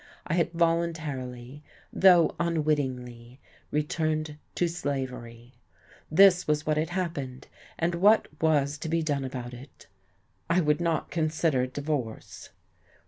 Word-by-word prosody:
I - - -2
had 170 -1 +1
voluntarily, 150 -6 -2 0.3
though 180 -3 +5
unwittingly, 130 -7 -2 0.3
returned 155 0 -1 0.2
to 175 - +1
slavery. 125 -7 -5 0.6
This 180 +2 +5
was 150 0 0
what 155 - +1
had 155 +1 0
happened. 165 -8 -4 0.3
And 170 +2 0
what 205 +6 +4
was 150 -2 +2
to 160 - -5
be 165 0 +1
done 145 -3 -1
about 125 -2 -6
it? 125 +2 -13 0.6
I 170 +2 +3
would 150 -1 +1
not 165 -2 -1
consider 155 -5 +1
divorce. 140 -4 -5
150 Hz, 120 wpm, -27 LUFS, 130-165 Hz, 0.6 s, though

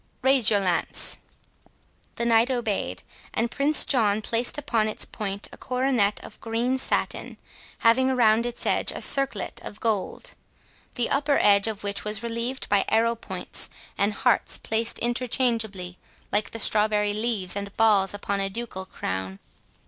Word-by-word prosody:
—Raise 265 -3 +4
your 205 -2 +2
lance." 180 -3 -1 1.0
The 235 - -2
Knight 230 +1 +4
obeyed; 240 -5 -2 0.3
and 230 +1 0
Prince 290 +2 +4
John 215 -5 +2
placed 235 +5 0
upon 230 -7 0
its 215 - -3
point 200 -1 -4
a - - -12
coronet 250 -5 0
of - - -12
green 235 +3 -1
satin, - - -2 0.5
having 260 +3 +5
around 235 -2 +3
its 240 - -5
edge - - +1
a - - -6
circlet 275 -8 +1
of 210 - -8
gold, 225 - -2 0.6
the 240 - -1
upper 285 0 +2
edge 200 0 +4
of 215 -2 -5
which 200 0 -3
was 210 +1 -1
relieved 235 +3 -4
by 200 -1 +3
arrow 230 +1 +2
points 230 - -3 0.3
and 205 +1 +1
hearts - - +1
placed 225 +1 0
interchangeably, 230 -6 -1 0.3
like 210 - 0
the - - -7
strawberry 210 -1 +3
leaves 210 -4 0
and 200 0 -4
balls 205 -3 +3
upon 200 0 -2
a 195 0 0
ducal 195 -3 -6
crown. 95 +1 -4
225 Hz, 150 wpm, -25 LUFS, 205-240 Hz, 1.0 s, having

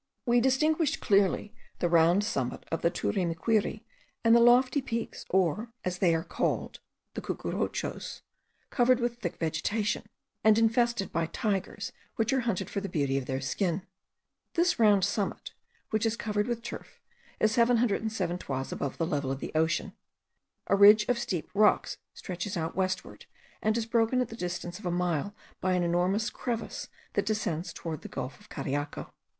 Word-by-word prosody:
We 240 -1 +4
distinguished 305 +4 +2
clearly 200 +1 +2 0.2
the 175 - +1
round 170 +3 +4
summit 130 - -2
of 165 - -1
the 170 - +3
Turimiquiri 190 +5 0 0.4
and 230 0 +6
the - - +7
lofty 250 +4 +5
peaks 230 -3 -4
or, 190 +5 +1
as 180 0 -2
they 170 -3 +4
are 165 - -1
called, - - -2 0.3
the - - -4
Cucuruchos, - - -3 0.5
covered 250 0 +4
with 240 0 -1
thick 175 -5 -4
vegetation, 205 +6 -1 0.4
and 220 0 +6
infested 230 -1 +2
by 165 0 0
tigers 200 +2 -2 0.2
which 225 +4 +1
are 265 - +3
hunted 200 -7 -1
for 200 - -3
the 200 - -4
beauty 140 -5 0
of 130 - -8
their 130 0 -1
skin. 175 +6 -1 0.7
This 355 -2 +2
round 205 -4 +5
summit, 205 0 -2 0.4
which 220 +1 +2
is 225 - 0
covered 210 0 -1
with 235 -1 -2
turf, - - -8 0.4
is 215 - +3
707 220 -6 +1
toises 135 -5 -4
above 140 - -3
the 165 - 0
level 145 -5 -1
of 135 - -3
the - - -5
ocean. 160 +1 +1 0.7
A - - +3
ridge 210 +2 +8
of 245 -1 +2
steep 180 -8 -2
rocks 210 +1 +3 0.2
stretches 185 +1 -4
out 160 0 -3
westward, 185 0 -2 0.3
and 220 +1 +1
is 230 - -1
broken 230 +2 +2
at 250 - 0
the 225 - -7
distance 175 -2 -4
of 205 - -5
a - - +1
mile 175 +2 -1 0.2
by 185 0 +1
an 180 -1 +2
enormous 180 +6 +1
crevice 230 -3 -4 0.3
that 205 - +1
descends 180 -6 -1
toward 160 -3 -6
the - - -7
gulf 135 - -5
of 210 - -19
Cariaco. 145 0 -4
205 Hz, 165 wpm, -29 LUFS, 175-230 Hz, 0.7 s, ridge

